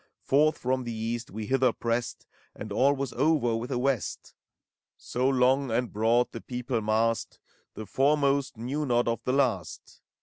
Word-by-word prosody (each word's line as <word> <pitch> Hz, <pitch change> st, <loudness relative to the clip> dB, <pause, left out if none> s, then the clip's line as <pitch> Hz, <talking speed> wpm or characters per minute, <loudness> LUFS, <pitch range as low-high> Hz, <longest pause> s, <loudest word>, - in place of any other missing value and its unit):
Forth 150 Hz, +3 st, +3 dB
from 130 Hz, +1 st, -1 dB
the 120 Hz, -, -5 dB
East 115 Hz, +1 st, -4 dB
we 110 Hz, +2 st, -6 dB
hither 130 Hz, +1 st, +2 dB
pressed, 115 Hz, +1 st, -3 dB, 0.3 s
And 105 Hz, -, -8 dB
all 135 Hz, +7 st, +3 dB
was 135 Hz, -2 st, -4 dB
over 135 Hz, -3 st, +2 dB
with 115 Hz, +3 st, -4 dB
the 130 Hz, -, -1 dB
West: 130 Hz, -1 st, -2 dB, 0.6 s
So 125 Hz, +2 st, -1 dB
long 130 Hz, +1 st, +2 dB
and 120 Hz, +1 st, -1 dB
broad 115 Hz, +3 st, +2 dB
the 115 Hz, -, -7 dB
people 125 Hz, -1 st, -3 dB
massed, 110 Hz, +2 st, 0 dB, 0.4 s
The 110 Hz, -, -6 dB
foremost 140 Hz, 0 st, +1 dB
knew 130 Hz, +7 st, -3 dB
not 120 Hz, -1 st, +2 dB
of 115 Hz, 0 st, -1 dB
the 125 Hz, -, 0 dB
last. 115 Hz, -, -1 dB
125 Hz, 165 wpm, -27 LUFS, 115-135 Hz, 0.6 s, Forth